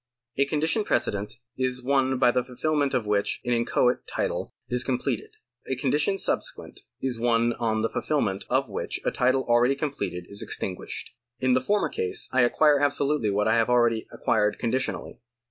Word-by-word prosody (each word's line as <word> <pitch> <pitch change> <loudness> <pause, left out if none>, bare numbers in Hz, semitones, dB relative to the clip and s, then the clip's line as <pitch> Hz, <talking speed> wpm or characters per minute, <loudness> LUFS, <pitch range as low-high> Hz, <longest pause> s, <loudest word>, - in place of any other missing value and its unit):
A 140 - +4
condition 160 +9 +1
precedent 105 - -1 0.3
is 125 -1 -1
one 135 0 +2
by 125 - +4
the 125 0 +1
fulfilment 140 +2 0
of 120 -4 0
which 105 -1 0
an 120 - +1
inchoate 120 +1 +1
title - - -2 0.2
is 125 0 -1
com 130 -2 0
pleted; 425 - -3 0.4
a - - -1
condition 405 -2 +1
subsequent - - -3 0.2
is 125 -3 -1
one 120 0 +2
on 110 -2 0
the 115 - +1
fulfilment 105 -11 -1
of 130 +1 +1
which 100 - -3
a - - +2
title 130 +1 +2
already 120 +3 +3
completed 135 - -3
is 100 - -5
extinguished. 90 -1 -4 0.3
In 130 -1 +2
the 130 - +3
former 205 +10 +1
case 90 - -1
I 130 - +3
acquire 145 +4 +4
absolutely 145 -4 +1
what 105 +1 +1
I 110 - +4
have 115 -1 +3
akeady 120 -2 +3
ac - - -13
quired 105 -2 +2
conditionally. 130 +2 -2
125 Hz, 180 wpm, -26 LUFS, 115-140 Hz, 0.4 s, A